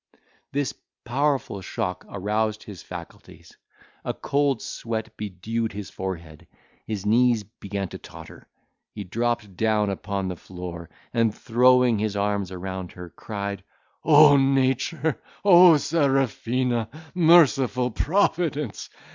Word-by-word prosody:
This 140 -1 -1 0.3
powerful 135 -4 -1
shock 90 0 -4
aroused 105 +2 -1
his 100 -4 -10
faculties; 90 -2 -11 0.5
a - - -3
cold 140 -3 0
sweat 110 -1 -5
bedewed 105 +3 -4
his 100 -1 -7
forehead; 85 -5 -7 0.4
his 105 -3 -4
knees 115 +1 +3
began 100 -1 -6
to - - -8
totter; - - -13 0.5
he 105 - -5
dropped 115 +3 -1 0.2
upon 100 -2 0
the 90 - -3
floor, 85 -1 -8 0.2
and 115 -3 +1
throwing 125 -1 +3
his 105 -1 -1
arms 100 -2 -1
around 95 0 -6
her, 90 -1 -10
cried, 100 -2 -5 0.4
"O 150 -2 +7
nature! 135 +3 +1 0.2
O 175 -4 +8
Serafina! 130 -6 0 0.2
Merciful 145 -8 +4
Providence! 155 - 0
110 Hz, 110 wpm, -24 LUFS, 100-135 Hz, 0.5 s, O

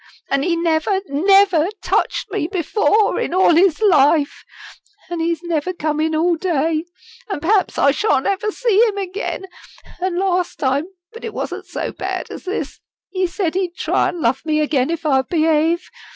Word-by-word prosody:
An' 275 0 +2
he 340 +3 +1
never, 335 +3 +1
never, 370 +2 +4 0.2
touched - - -1
me 310 - -1
before 410 +4 +1
in 345 - -2
all 370 -2 +5
his 340 -1 +4
life. 300 -5 +3 0.7
An' 345 - -3
he's 335 0 -1
never 340 +1 -2
come 305 -3 -2
in 315 0 0
all 335 +2 +2
day. 320 -2 0 0.4
An' 390 - -3
perhaps 385 +6 +1
I 280 - +4
shan't 285 -5 +1
ever 400 +2 0
see 455 -1 +2
him 410 -2 -3
again. 390 0 -4 0.5
An' 360 -1 -2
last 365 -1 0
time 275 +2 0 0.3
but 460 - -11
it 445 -2 -6
wasn't - - -5
so - - -4
bad - - -5
as - - -9
this 380 +3 -4 0.3
he 370 -1 0
said 345 -2 -2
he'd 360 -2 -2
try - - +1
an' 350 - -4
love 245 +3 +1
me 310 -1 0
again 285 -3 +1
if 335 0 -3
I'd 265 -3 +2
behave. 325 +1 +1
340 Hz, 175 wpm, -19 LUFS, 310-380 Hz, 0.7 s, all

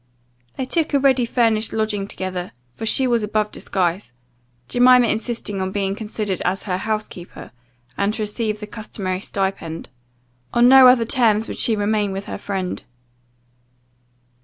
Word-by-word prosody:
They 260 - -2
took 315 +2 0
a - - +4
ready 265 -3 +3
furnished 225 -3 +1
lodging 215 -2 -1
together, 185 -4 -5 0.2
for 220 - -6
she 265 - +3
was 240 -2 +2
above 210 0 -1
disguise; 180 -7 -2 0.5
Jemima 250 - +5
insisting 220 -3 -2
on 190 0 -2
being 195 -1 -1
considered 210 -3 -3
as 185 +2 -1
her 180 -3 -2
house 215 +2 -2
keeper, 175 -1 -11 0.5
and 200 +1 +2
to 220 - -2
receive 215 0 -2
the - - -4
customary 195 -3 -5
stipend. 190 -5 -3 0.7
On 240 0 +6
no 260 0 +9
other 250 -2 +5
terms 225 -2 +2
would - - -6
she 225 - +2
remain 205 -1 0
with 195 +1 -5
her - - -6
friend. 190 -2 -4
215 Hz, 155 wpm, -21 LUFS, 195-235 Hz, 0.7 s, no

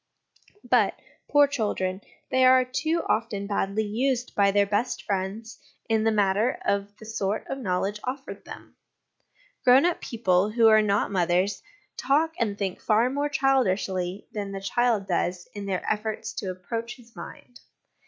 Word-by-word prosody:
But, - - +2 0.3
poor 290 0 +6
children, 205 -8 -2 0.3
they 260 0 +3
are 255 0 +6
too 315 +6 -1
often 215 -3 -1
badly 200 +1 -1
used 250 +4 -1
by 200 -1 +3
their 200 0 +3
best 205 +5 -1
friends 200 +3 -4 0.3
in 220 -1 +2
the 225 - +4
matter 210 +3 +2
of 200 +1 -1
the 220 - -12
sort 215 -2 -2
of 270 - -4
knowledge 200 -1 -1
offered 265 +2 -6
them. - - -12 0.9
Grown 255 +5 +6
up 350 -1 0
people 200 -5 +1
who 225 +1 +4
are 215 0 +6
not 205 -1 +1
mothers 185 +1 +1 0.4
talk 300 +5 +1
and 210 -4 -1
think 195 -3 -3
far 225 +4 +2
more 285 +2 -1
childishly 195 -9 0
than 205 -2 -4
the 195 - -4
child 225 +1 +1
does 175 0 -1
in 205 -1 -6
their 190 -2 -2
efforts 215 0 -2
to 195 - -3
approach 225 +6 -5
his 235 -2 -20
mind. 245 - -11
215 Hz, 155 wpm, -26 LUFS, 195-250 Hz, 0.9 s, poor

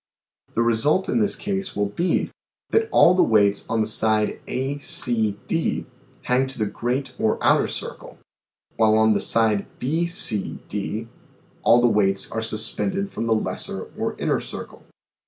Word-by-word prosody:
The 115 - +2
result 120 +11 +2
in - - +1
this 210 -2 +2
case 195 -1 -3
will 105 0 +1
be, 175 - 0 0.4
that 445 0 +2
all 175 - +6
the 180 - +3
weights 105 -2 +2
on 115 0 +1
the - - +1
side 110 0 +1
A, 135 +3 -3
C, 110 -7 +1
D, 165 -1 -1 0.4
hang 130 +1 +1
to 135 - -7
the 110 - 0
great 130 +5 -3
or 110 - +1
outer - - +3
circle, - - -6 0.6
while 110 -1 +4
on 110 0 +4
the - - +1
side 110 -3 +1
B, 160 +6 -1
C, 170 - -1
D, 105 +2 -4 0.5
all 120 - +5
the 120 - +5
weights 100 -3 +1
are 110 - -2
sus 110 0 -2
pended 195 +1 -2
from 115 - -3
the 115 - +3
lesser 110 - -4
or - - -3
inner - - 0
circle. - - -8
115 Hz, 170 wpm, -23 LUFS, 110-145 Hz, 0.6 s, all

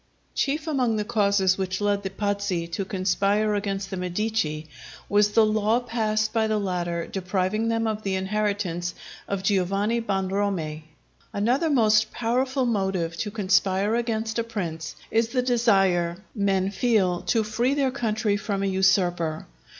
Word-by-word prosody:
Chief 300 +2 -1
among 255 -8 +1
the 210 -1 -1
causes 200 -3 +2
which 185 -1 -2
led 205 -1 +1
the 195 - -4
Pazzi 200 -3 -1
to 195 - -2
conspire 200 +2 +1
against 200 -1 -2
the 190 - -3
Medici, 180 -4 -2 0.4
was 205 0 +3
the 225 - +6
law 215 +2 +2
passed 220 -3 -1
by 225 -1 +2
the 215 0 +1
latter 175 -4 -2
depriving 190 +3 -1
them 225 0 0
of 215 -1 -2
the 195 -2 -1
inheritance 190 -3 -1 0.3
of 200 -1 -3
Giovanni 200 +4 +1
Bonromei. 190 -6 -2 0.5
Another 245 +10 +1
most 220 -5 +4
powerful 255 +3 0
motive 190 -7 -1
to 210 - -2
conspire 195 0 +1
against 225 -1 -1
a - - +1
prince 175 -8 -5 0.2
is 225 0 +2
the 250 0 0
desire 195 -8 +2 0.2
men 195 -2 +1
feel 195 -6 +1
to 225 -2 +2
free 235 +6 0
their 275 -2 +1
country 220 -5 0
from 200 -1 -2
a - - +1
usurper. 185 -4 +1
205 Hz, 150 wpm, -25 LUFS, 190-225 Hz, 0.5 s, the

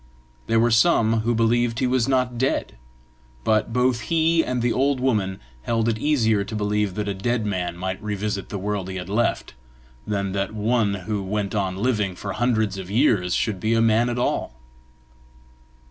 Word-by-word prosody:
There 115 0 +3
were 120 +1 +3
some 115 -3 +4
who 115 +2 0
believed 115 +1 +2
he 130 - +1
was 125 -2 +1
not 125 -2 0
dead; 130 +2 -1 0.7
but 110 +4 +1
both 125 0 +2
he 165 0 +3
and 125 -2 -2
the 120 - +2
old 135 +1 +1
woman 105 -7 0 0.2
held 115 - 0
it 110 -1 0
easier 110 -8 +2
to 110 - -7
believe 105 -2 -1
that 105 -1 -3
a 100 - -1
dead 110 +4 -1
man 90 -4 -2
might 95 +2 -4
revisit 105 -1 -3
the 100 - -4
world 100 -1 -3
he 95 - -5
had 90 0 -6
left, 115 +4 0 0.5
than 100 -2 -1
that 100 +2 -2
one 110 -1 +1
who 105 -2 -2
went 100 +1 -2
on 95 -3 -1
living 105 -4 0
for 100 +1 -5
hundreds 110 -4 0
of 95 -1 -7
years 105 -6 +2
should 105 -4 -1
be 110 +3 +1
a - - +3
man 115 +2 +3
at 120 - -2
all. 120 - -1
110 Hz, 185 wpm, -23 LUFS, 100-120 Hz, 0.7 s, some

